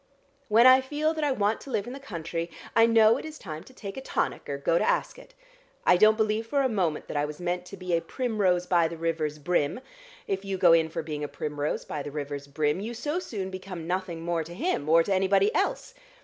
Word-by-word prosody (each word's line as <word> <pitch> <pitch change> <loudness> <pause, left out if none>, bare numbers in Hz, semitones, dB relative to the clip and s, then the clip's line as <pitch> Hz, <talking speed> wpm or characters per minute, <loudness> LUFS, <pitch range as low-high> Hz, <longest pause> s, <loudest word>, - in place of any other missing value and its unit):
When 230 +3 +5
I 260 +1 +8
feel 300 +4 -1
that 315 -1 -3
I 290 - +2
want 210 -3 0
to - - -11
live 215 -5 -1
in 245 - -7
the 275 - -7
country, 170 - -5 0.3
I 225 0 +6
know 225 0 +5
it - - -8
is 315 0 -8
time 155 - -7
to - - -15
take 205 -5 -8
a - - -4
tonic 265 - -2
or 140 - -2
go 165 +4 +1
to - - +1
Ascot. - - -2 0.5
I 180 - +6
don't 215 +4 +5
believe 220 +1 0
for 280 +2 +1
a - - +3
moment 180 -10 -1
that - - -6
I 145 0 +1
was 150 0 -7
meant 180 0 -2
to 195 - -9
be 180 -1 -3
a 165 - +1
'primrose 195 -4 0
by 175 -2 +3
the 165 +1 -7
river's 160 -2 -2
brim.' 155 +4 0 0.5
If 195 0 -2
you 195 -1 -3
go 175 -2 +6
in 165 -1 +3
for 165 0 -4
being 150 -1 -5
a - - -2
primrose 150 0 -3
by 150 - -4
the 145 - -6
river's 145 -1 -5
brim, 150 +3 0
you 225 +4 -5
so 295 +8 -2
soon 195 - -5
become 185 -3 -7
'nothing 180 -1 -3
more 170 -1 -1
to 170 +2 -10
him' 185 - -1
or 165 +1 +6
to 195 - 0
anybody 195 +2 +3
else. 450 +7 -1
185 Hz, 245 wpm, -27 LUFS, 165-225 Hz, 0.5 s, I